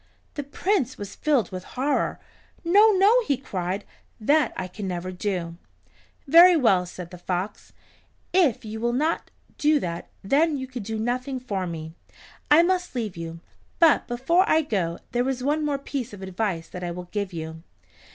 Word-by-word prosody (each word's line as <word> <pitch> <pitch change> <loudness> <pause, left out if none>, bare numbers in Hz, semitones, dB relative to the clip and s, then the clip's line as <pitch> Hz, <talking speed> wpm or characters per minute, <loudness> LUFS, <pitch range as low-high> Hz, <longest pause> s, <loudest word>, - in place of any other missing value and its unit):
The 295 - -3
Prince 285 - -1
was 205 -1 -7
filled 285 -9 +1
with 185 -1 -6
horror. 280 +3 0 0.5
"No, 410 +6 +6
no," 405 +6 +5
he 280 - +2
cried, 190 -5 -4 0.3
"that 290 +7 +3
I 185 - -3
can 195 +2 -6
never 180 0 -3
do." 180 -3 -3 0.7
"Very 345 +4 +8
well," 195 - +3
said 180 -1 -9
the 180 - -10
fox. 185 +3 -4 0.6
"If 325 - +3
you 220 +1 -5
will 240 +1 0
not 305 +6 0 0.3
do 300 0 +4
that, 170 -7 -4 0.2
then 290 +8 +2
you 260 - -4
can 255 -2 -7
do 220 +2 -4
nothing 250 +4 -2
for 200 -7 -3
me. 160 -1 -6 0.6
I 310 +3 +7
must 360 -3 0
leave 220 -6 -3
you, 165 0 -7 0.4
but 330 -3 +5
before 265 +10 +2
I 320 0 +4
go 175 - -1
there 245 +2 +1
is 255 -1 -3
one 300 +3 +1
more 290 -2 0
piece 275 -3 -5
of 195 -1 -9
advice 185 -3 -2
that 180 - -7
I 175 - -2
will 180 +1 -7
give 200 -2 -2
you. 160 -1 -6
230 Hz, 175 wpm, -25 LUFS, 185-295 Hz, 0.7 s, Very